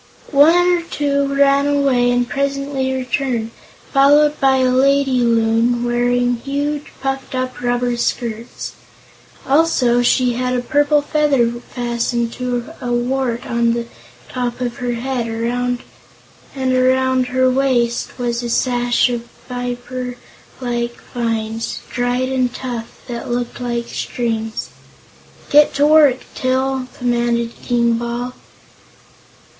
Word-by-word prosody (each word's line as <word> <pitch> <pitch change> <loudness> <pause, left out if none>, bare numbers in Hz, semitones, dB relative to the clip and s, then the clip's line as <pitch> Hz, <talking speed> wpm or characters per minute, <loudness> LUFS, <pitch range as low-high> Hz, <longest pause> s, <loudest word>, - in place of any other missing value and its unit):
One 295 +3 +6
or 355 0 +3
two 280 -3 -1
ran 280 0 +3
away 275 -4 +2
and 245 0 +1
presently 275 -1 -1
returned, 255 -3 -2 0.4
followed 290 +2 +5
by 270 -1 +4
a 255 -1 +2
lady 270 0 +3
Loon 230 0 +2
wearing 245 0 +1
huge, 285 +3 -3
puffed 270 -1 -3
up 255 -1 -3
rubber 245 0 0
skirts. 235 -1 -3 0.8
Also 270 -5 +3
she 245 0 +3
had 250 +1 -1
a 250 - 0
purple 290 +1 +2
feather 290 -5 +2
fastened 235 -1 -2
to 250 +2 -3
a 245 -1 -3
wart 240 0 -1
on 235 0 +1
the 235 0 -2 0.4
top 245 -1 -3
of 245 -2 -3
her 245 -1 -2
head, 245 0 -2
and 245 +2 -4
around 260 0 +2
her 255 +1 +2
waist 255 -3 +1
was 240 -1 -1
a 240 - -4
sash 245 0 +2
of 240 -1 -3 0.2
fibre 245 0 -4 0.4
like 240 -1 -2 0.2
vines, 225 -1 -2
dried 245 +1 0
and 255 -2 0
tough, 240 -3 -6
that 235 -1 -5
looked 240 0 -3
like 235 -1 -2
strings. 225 -3 -3 0.8
"Get 295 0 +5
to 285 +1 +3
work, 295 -4 +5
Til," 260 0 -1
commanded 235 -1 0
King 235 -1 +1
Bal. 240 +1 -4
245 Hz, 120 wpm, -18 LUFS, 240-270 Hz, 0.8 s, One